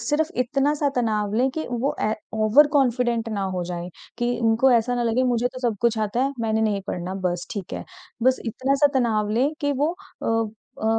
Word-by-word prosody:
सिर्फ़ 315 Hz, +3 st, 0 dB
इतना-सा 285 Hz, +4 st, +1 dB
तनाव 215 Hz, -4 st, 0 dB
लें 255 Hz, +4 st, +3 dB
कि 315 Hz, +4 st, -4 dB
वो 245 Hz, +3 st, -1 dB
ए 215 Hz, -, +1 dB, 0.2 s
ओवर 220 Hz, +7 st, +5 dB
कॉन्फिडेंट 240 Hz, -3 st, +1 dB
ना 205 Hz, -3 st, -2 dB
हो 180 Hz, -, -2 dB
जाएँ 175 Hz, 0 st, -5 dB, 0.3 s
कि 240 Hz, 0 st, 0 dB
उनको 230 Hz, +4 st, +4 dB
ऐसा 240 Hz, +1 st, +2 dB
ना 245 Hz, -, 0 dB
लगे 235 Hz, +2 st, +1 dB
मुझे 240 Hz, +1 st, +1 dB
तो -, -, -5 dB
सब 220 Hz, -, -3 dB
कुछ 235 Hz, -2 st, +2 dB
आता 215 Hz, +3 st, 0 dB
है, 275 Hz, -, -1 dB
मैंने 220 Hz, -1 st, +1 dB
नहीं 210 Hz, -2 st, +1 dB
पढ़ना 180 Hz, +1 st, -4 dB
बस 175 Hz, -1 st, -1 dB
ठीक 200 Hz, -5 st, -6 dB
है। -, -, -5 dB, 0.4 s
बस 260 Hz, +1 st, +3 dB
इतना-सा 270 Hz, +5 st, +2 dB
तनाव 215 Hz, -4 st, +1 dB
लें 270 Hz, +4 st, +3 dB
कि 285 Hz, 0 st, +1 dB
वो 320 Hz, +4 st, +1 dB, 0.3 s
अ 225 Hz, 0 st, +1 dB, 0.4 s
अ, -, -, -2 dB
235 Hz, 200 wpm, -24 LUFS, 215-260 Hz, 0.4 s, ओवर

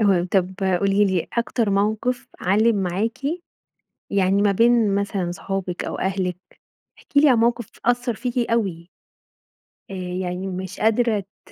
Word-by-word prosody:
اهم، 190 Hz, -4 st, +3 dB
طب 190 Hz, -1 st, +1 dB, 0.3 s
قولي 200 Hz, +1 st, +3 dB
لي، 190 Hz, -4 st, 0 dB
أكتر 235 Hz, -2 st, 0 dB
موقف 220 Hz, +6 st, 0 dB
علّم 215 Hz, +4 st, +3 dB
معاكِ 195 Hz, +6 st, -1 dB, 0.9 s
يعني 195 Hz, 0 st, +2 dB
ما 205 Hz, -1 st, +4 dB
بين 230 Hz, -1 st, +4 dB
مثلًا 200 Hz, -3 st, -1 dB
صحابِك 185 Hz, -1 st, -4 dB
أو -, -, -4 dB
أهلِك، 190 Hz, -2 st, -1 dB, 0.6 s
احكِ -, -, -19 dB
لي 290 Hz, +1 st, +7 dB
عن 245 Hz, -, +4 dB
موقف 235 Hz, -1 st, +1 dB, 0.2 s
أثّر 245 Hz, 0 st, +1 dB
فيكِ 240 Hz, +1 st, -2 dB
أوي. 185 Hz, -7 st, -1 dB, 1.0 s
آآ -, -, -6 dB
يعني 180 Hz, 0 st, -4 dB
ومش 185 Hz, 0 st, -6 dB
قادرة 220 Hz, -2 st, +2 dB, 0.2 s
ت -, -, -19 dB
200 Hz, 140 wpm, -22 LUFS, 185-230 Hz, 1.0 s, لي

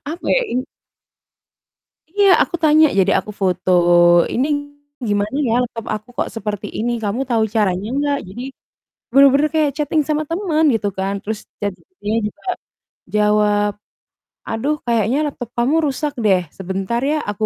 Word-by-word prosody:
apa 340 Hz, +3 st, -7 dB
ya, -, -, +4 dB
ini 255 Hz, +2 st, -1 dB, 1.5 s
Iya, 400 Hz, +3 st, +3 dB
aku -, -, 0 dB
tanya, 310 Hz, 0 st, +6 dB
jadi 190 Hz, +1 st, +3 dB
aku 210 Hz, -, -8 dB
foto, 185 Hz, -1 st, 0 dB, 0.6 s
"Ini, 260 Hz, +4 st, +1 dB, 0.6 s
gimana 205 Hz, +4 st, -1 dB
ya 225 Hz, -, +1 dB
laptop 230 Hz, -2 st, -5 dB
aku 215 Hz, 0 st, -9 dB
kok -, -, -1 dB
seperti 210 Hz, -1 st, -4 dB
ini? 235 Hz, +2 st, -1 dB
Kamu 210 Hz, +5 st, -1 dB
tahu 225 Hz, -2 st, +2 dB
caranya 200 Hz, -1 st, +1 dB
enggak?" 285 Hz, +1 st, 0 dB
Jadi 225 Hz, +6 st, -8 dB, 0.7 s
benar-benar 275 Hz, +2 st, +5 dB
kayak, 305 Hz, -2 st, +3 dB
chatting 305 Hz, +1 st, +1 dB
sama 305 Hz, 0 st, 0 dB
temen 330 Hz, -3 st, 0 dB
gitu 215 Hz, -2 st, 0 dB
kan 195 Hz, +1 st, -1 dB
terus 215 Hz, 0 st, -4 dB, 0.2 s
ChatGPT-nya 205 Hz, -, -4 dB
juga 210 Hz, -, -13 dB, 0.7 s
jawab. 210 Hz, 0 st, +3 dB, 0.8 s
"Aduh, 245 Hz, +7 st, 0 dB
kayaknya 230 Hz, +1 st, +1 dB
laptop 245 Hz, -5 st, -6 dB
kamu 250 Hz, +6 st, +2 dB
rusak 290 Hz, +1 st, -2 dB
deh, 190 Hz, -3 st, +4 dB, 0.2 s
sebentar 190 Hz, +5 st, -2 dB
ya 310 Hz, -, +1 dB
aku." 210 Hz, +1 st, -3 dB
225 Hz, 145 wpm, -19 LUFS, 205-290 Hz, 1.5 s, tanya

